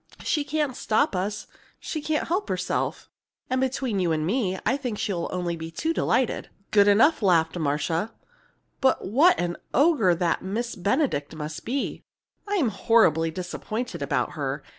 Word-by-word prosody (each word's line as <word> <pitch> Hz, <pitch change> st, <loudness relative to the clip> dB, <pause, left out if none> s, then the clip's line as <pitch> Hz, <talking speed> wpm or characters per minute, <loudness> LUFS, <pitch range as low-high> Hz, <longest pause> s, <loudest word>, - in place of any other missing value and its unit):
She 300 Hz, -, +1 dB
can't 290 Hz, -2 st, -1 dB
stop 215 Hz, -5 st, +1 dB
us 205 Hz, +3 st, -2 dB, 0.3 s
she 310 Hz, -, -4 dB
can't 305 Hz, +1 st, -1 dB
help 375 Hz, +5 st, -1 dB
herself; -, -, -2 dB, 0.4 s
and 255 Hz, 0 st, +1 dB
between 260 Hz, -5 st, -1 dB
you 175 Hz, -3 st, +1 dB
and 155 Hz, -1 st, 0 dB
me, 190 Hz, -1 st, 0 dB
I 265 Hz, -, +3 dB
think 250 Hz, -6 st, -4 dB
she'll 185 Hz, -6 st, -2 dB
be -, -, -9 dB
only 170 Hz, -2 st, -3 dB
too 320 Hz, -, -2 dB
delighted!" 260 Hz, -6 st, 0 dB, 0.2 s
"Good 205 Hz, -1 st, +5 dB
enough!" 225 Hz, +10 st, +5 dB
laughed 170 Hz, -5 st, +3 dB
Marcia. 160 Hz, +7 st, -1 dB, 0.7 s
"But 265 Hz, -1 st, +2 dB
what 290 Hz, -, +4 dB
an 175 Hz, 0 st, -1 dB, 0.2 s
ogre 280 Hz, -, +4 dB
that 170 Hz, -1 st, 0 dB
Miss 230 Hz, +6 st, -3 dB
Benedict 195 Hz, -, 0 dB
must 155 Hz, 0 st, -6 dB
be! 265 Hz, +4 st, -2 dB, 0.5 s
I'm 385 Hz, -, +1 dB
horribly 190 Hz, -6 st, +3 dB
disappointed 185 Hz, +7 st, -5 dB
about -, -, 0 dB
her. -, -, -3 dB
210 Hz, 155 wpm, -25 LUFS, 175-265 Hz, 0.7 s, Good